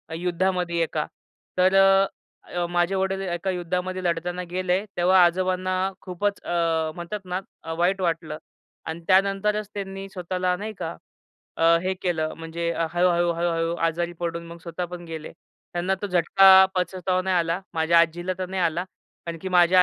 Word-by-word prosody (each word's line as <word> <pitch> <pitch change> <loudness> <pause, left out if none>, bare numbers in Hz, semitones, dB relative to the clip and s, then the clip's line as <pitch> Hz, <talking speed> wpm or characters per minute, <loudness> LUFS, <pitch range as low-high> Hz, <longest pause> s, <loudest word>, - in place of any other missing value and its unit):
युद्धामध्ये 180 0 0
एका 155 -2 -2 0.5
तर 185 +1 +4
अ, 195 0 +6 0.5
अ, 175 -1 0
माझे 175 +2 +1
वडील 190 0 0
एका 180 0 -2
युद्धामध्ये 180 +1 -3
लढताना 175 +1 -1
गेले, 185 +1 0
तेव्हा 180 +1 +5
आजोबांना 185 +1 0 0.3
खूपच 200 +2 -2
अ, 165 -2 0
म्हणतात 175 +4 -5
ना 180 0 -2 0.2
अ, 165 - -4
वाईट 185 +3 +1
वाटलं 165 -3 -1 0.5
अन् 160 +1 -5
त्यानंतरच 200 +2 +2
त्यांनी 195 -1 -5
स्वतःला 180 -1 -1
नाही 215 +2 -5
का, - - -4 0.6
अ, - - -2 0.2
हे 185 +1 0
केलं 160 -3 0
म्हणजे 170 +1 -3 0.2
हळू-हळू, 175 -1 +3
हळू-हळू 165 0 0
आजारी 170 +1 -1
पडून 170 0 -3
मग 170 0 -10
स्वतः 175 +1 -4
पण 175 0 -8
गेले. 160 -2 -7 0.4
त्यांना 175 +2 0
तो 205 - 0
झटका 190 +1 +7
पचवता 185 0 0
नाही 190 0 +1
आला. 170 +1 0
माझ्या 165 +1 +4
आज्जीला 175 +2 0
तर 185 - -2
नाही 190 -1 -2
आला. 170 +2 0 0.4
आणखी 170 +2 -5
माझ्या 180 0 +6
180 Hz, 155 wpm, -24 LUFS, 170-185 Hz, 0.6 s, झटका